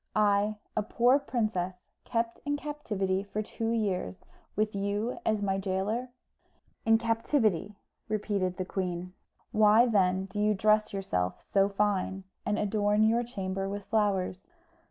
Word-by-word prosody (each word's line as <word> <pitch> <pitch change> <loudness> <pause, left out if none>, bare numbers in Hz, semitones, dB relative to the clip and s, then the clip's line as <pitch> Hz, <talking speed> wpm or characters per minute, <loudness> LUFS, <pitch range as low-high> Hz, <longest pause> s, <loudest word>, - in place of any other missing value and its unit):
I, 210 0 +3 0.2
a - - +2
poor 245 +6 +3
princess, 200 -9 -2
kept 230 0 -1
in 290 0 -1
captivity 210 -11 -2
for 205 +2 -4
two 225 +1 -3
years, 190 - -1 0.3
with 215 +1 0
you 205 +4 -2
as 215 -1 +1
my 195 -1 0
gaoler?" 200 +6 -1 0.8
"In 225 0 +6
captivity," 225 - +1 0.3
repeated 200 -4 -1
the 185 - -2
queen. 180 -1 -3 0.4
"Why, 215 +2 +6
then, 190 -4 +2
do 195 +2 -6
you 210 0 +3
dress 215 +2 +3
yourself 90 - -2
so 195 0 +2
fine, 195 -1 0 0.2
and 210 - +1
adorn 210 0 +2
your 225 +2 +4
chamber 195 -4 -3
with 200 0 -4
flowers?" 200 - 0
205 Hz, 135 wpm, -29 LUFS, 190-220 Hz, 0.8 s, In